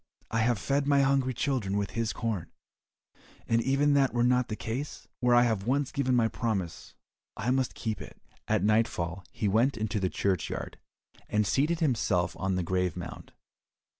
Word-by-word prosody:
I 115 - +1
have 115 +1 +2
fed 140 +6 0
my 140 -1 +4
hungry 135 -1 +2
children 115 -9 0
with 100 -1 -2
his 115 -1 -1
corn, 105 -8 -3 1.0
and 115 0 +3
even 140 +3 +2
if - - +4
that 135 -3 +2
were 120 - +3
not 125 0 +3
the 110 - -3
case, 115 +7 -5
where 125 -1 +4
I 120 - +6
have 110 -4 0
once 140 +1 +1
given 130 -3 +1
my 115 -2 +4
promise 100 -7 -3 0.4
I 120 +4 0
must 130 -1 0
keep 110 -2 -3
it." - - -11 0.3
At 105 -3 +1
nightfall 100 -5 +1
he 105 - -2
went 115 +7 +2
into 110 0 -1
the 95 -1 0
churchyard, 95 -4 -2 0.5
and 105 0 +2
seated 150 - +1
himself 105 - +1
on 95 0 0
the 90 - 0
grave 90 0 -1
mound. - - -8
115 Hz, 180 wpm, -29 LUFS, 100-130 Hz, 1.0 s, I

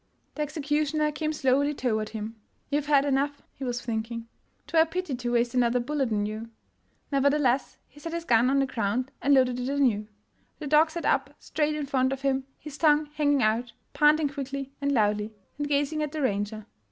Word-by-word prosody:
The 300 - -5
executioner 300 0 0
came 310 +1 -2
slowly 285 0 +1
toward 220 -5 -1
him. 220 0 -6
' - - -44
' - - -43
You 290 +1 +2
've 290 - -12
had 285 -2 +4
enough," 285 +1 0
he 275 - -9
was 245 -1 -3
thinking; 230 0 -3 0.2
" - - -43
'twere 325 - +3
a - - +5
pity 355 -2 -3
to 245 -1 -3
waste 240 0 +1
another 245 -1 +2
bullet 270 0 -1
on 205 -1 +1
you. 215 +2 -5 0.2
' - - -44
' - - -42
Nevertheless, 275 -2 +2
he 295 - -18
set 330 +2 -6
his 335 0 -4
gun 240 -1 +4
on 275 - +2
the 275 - +3
ground 250 +1 -2
and 285 0 +4
loaded 250 -2 +3
it 250 +1 -2
anew. 250 -7 +1 0.5
The 305 - -7
dog 305 +2 +4
sat 330 -1 -5
up 275 +1 +1
straight 300 0 -1
in 300 -1 -2
front 260 -1 +1
of 270 0 -4
him, 270 -1 0
his 300 -1 -10
tongue 300 -1 +4
hanging 290 -3 +2
out, 230 +3 0 0.2
panting 300 0 +4
quickly 275 -1 -5
and 280 0 +1
loudly, 210 -3 +1 0.2
and 290 - -1
gazing 290 +2 +1
at 300 -1 -3
the 305 -2 -2
ranger. 205 -2 -1
275 Hz, 215 wpm, -27 LUFS, 240-295 Hz, 0.5 s, a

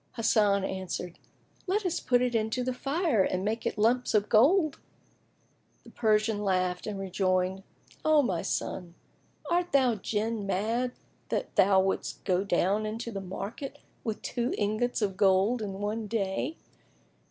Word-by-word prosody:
Hasan 210 -4 +3
answered, 185 -2 -4 0.5
"Let 400 +2 0
us 355 -2 0
put 245 -1 +2
it 250 -1 0
in 220 -1 +1
the 250 +2 -1
fire, 280 - +1
and 185 +1 -1
make 220 +2 -1
of - - -1
it - - -25
lumps 235 +3 +2
of 210 0 +2
gold." 305 - +4 1.0
The - - -15
Persian 215 -1 +1
laughed 185 -1 0
and 210 -2 -3
rejoined, 185 0 0 0.4
"O 310 -2 +5
my 180 -9 0
son, 175 -2 -3 0.6
art 350 0 +1
thou 260 -4 +4
Jinn 215 +1 -2
mad 230 +6 0 0.4
that - - -2
thou 195 0 +5
wouldst 190 0 -2
go 185 -1 +1
down 200 +3 +1
into 230 +2 -4
the 195 -2 -4
market 200 +8 -6 0.3
with 220 -3 -4
two 240 0 -1
ingots 215 +3 0
of 195 -2 -1
gold 200 +4 +3
in 200 -2 -4
one 210 +3 -3
day? 210 +8 -2
215 Hz, 155 wpm, -29 LUFS, 195-245 Hz, 1.0 s, O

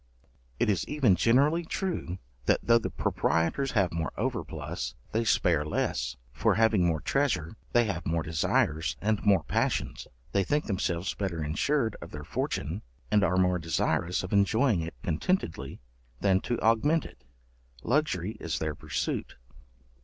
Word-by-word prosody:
It - - +2
is 100 -5 +1
even 135 -11 +3
generally 140 - +3
true, 165 - -3 0.3
that, - - +3
though 115 0 +5
the - - -3
proprietors 85 - 0
have 100 -6 +2
more 85 -1 -2
overplus, 60 +2 -3 0.2
they 115 +1 +1
spare 85 -8 +3
less; 75 -3 -1 0.2
for, 100 +8 +2
having 110 -3 +4
more 80 -3 0
treasure, 125 - 0 0.2
they 120 - +5
have 100 -7 -3
more 80 0 0
desires, 80 -1 0
and 105 0 0
more 100 -6 +4
passions; - - -1 0.2
they 100 - +2
think 150 +10 0
themselves 90 -3 -1
better 85 -6 -3
ensured 110 - 0
of 85 - -8
their 75 -2 -7
fortune; - - -3 0.3
and 105 -1 +4
are 90 -1 +2
more 90 -1 +3
desirous 85 +2 0
of 90 - -5
enjoying 105 +1 +3
it 80 0 -6
contentedly, 80 - -1 0.4
than 95 -1 +3
to 120 - -2
augment 145 +9 +3
it; 65 - -13 0.6
luxury 110 - 0
is 80 -4 -2
their 80 0 -2
pursuit. - - -3
95 Hz, 150 wpm, -29 LUFS, 80-115 Hz, 0.6 s, though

